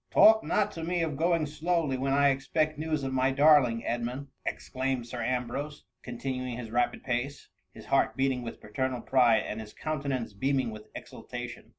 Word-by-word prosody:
" -, -, -52 dB
Talk 220 Hz, 0 st, +7 dB
not 210 Hz, 0 st, +1 dB
to 165 Hz, -, -7 dB
me 175 Hz, 0 st, 0 dB
of 155 Hz, -3 st, -2 dB
going 165 Hz, +1 st, +2 dB
slowly, 155 Hz, -1 st, 0 dB
when 135 Hz, +1 st, -1 dB
I 140 Hz, +1 st, +5 dB
expect 155 Hz, +3 st, 0 dB
news 155 Hz, -2 st, -1 dB
of 135 Hz, 0 st, -2 dB
my 130 Hz, 0 st, +2 dB
darling 135 Hz, -4 st, +4 dB
Edmund 120 Hz, +4 st, -3 dB
!" -, -, -45 dB
ex -, -, -4 dB
claimed 130 Hz, -2 st, -2 dB
Sir 120 Hz, 0 st, -6 dB
Ambrose, 130 Hz, +5 st, -3 dB, 0.2 s
continuing 125 Hz, 0 st, -4 dB
his 115 Hz, -3 st, -7 dB
rapid 120 Hz, +1 st, 0 dB
pace 130 Hz, +3 st, -3 dB
— -, -, -49 dB
his -, -, -11 dB
heart -, -, +2 dB
beating 135 Hz, -1 st, +1 dB
with 115 Hz, -, -7 dB
paternal 125 Hz, +3 st, -2 dB
pride, 120 Hz, -4 st, +4 dB
and 110 Hz, -, -4 dB
his 105 Hz, -1 st, -11 dB
countenance 135 Hz, -7 st, -3 dB
beaming 130 Hz, +2 st, 0 dB
with 110 Hz, 0 st, -10 dB
exultation. -, -, -8 dB
135 Hz, 195 wpm, -29 LUFS, 120-150 Hz, 0.2 s, Talk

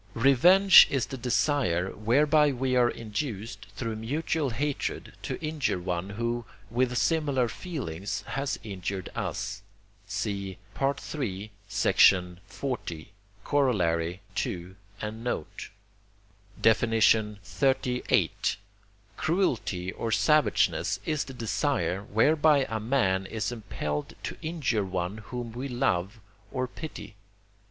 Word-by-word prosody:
Revenge 175 Hz, +11 st, +8 dB
is 135 Hz, -2 st, 0 dB
the 135 Hz, -, -7 dB
desire 120 Hz, -, +1 dB
whereby 145 Hz, +7 st, +3 dB
we 130 Hz, 0 st, 0 dB
are 120 Hz, -1 st, +5 dB
induced, 115 Hz, 0 st, -5 dB
through 115 Hz, -3 st, -3 dB
mutual 145 Hz, +5 st, -1 dB
hatred, 140 Hz, +4 st, -3 dB
to -, -, -4 dB
injure 155 Hz, -9 st, 0 dB
one 90 Hz, +1 st, -3 dB
who, 115 Hz, +3 st, -2 dB, 0.3 s
with 125 Hz, +1 st, +1 dB
similar 140 Hz, +1 st, +2 dB
feelings, 110 Hz, -, -5 dB
has 135 Hz, +4 st, -2 dB
injured 95 Hz, -2 st, -5 dB
us. 100 Hz, -, -3 dB, 0.5 s
(See 100 Hz, -2 st, -3 dB, 0.2 s
III. 130 Hz, -7 st, -2 dB, 0.2 s
xl. 95 Hz, -, +5 dB, 1.3 s
Coroll. 90 Hz, -, +1 dB, 0.2 s
ii 90 Hz, +1 st, -5 dB, 0.3 s
and 110 Hz, +2 st, -5 dB
note.) 120 Hz, -10 st, -4 dB, 0.9 s
XXXVIII. 115 Hz, +3 st, +2 dB, 0.9 s
Cruelty 115 Hz, -, 0 dB
or 115 Hz, -, -4 dB
savageness 150 Hz, 0 st, +2 dB
is 155 Hz, -2 st, 0 dB
the 135 Hz, -, -9 dB
desire, 110 Hz, -, 0 dB
whereby 145 Hz, +7 st, +3 dB
a 110 Hz, -, -2 dB
man 100 Hz, -6 st, +1 dB
is 110 Hz, +3 st, -2 dB
impelled 75 Hz, -10 st, -4 dB
to -, -, -4 dB
injure 150 Hz, -10 st, 0 dB
one 95 Hz, +2 st, -3 dB
whom 120 Hz, +2 st, -6 dB
we 125 Hz, +4 st, -5 dB
love 110 Hz, -5 st, 0 dB, 0.3 s
or 130 Hz, 0 st, -1 dB
pity. 155 Hz, -3 st, -8 dB
115 Hz, 105 wpm, -28 LUFS, 100-140 Hz, 1.3 s, Revenge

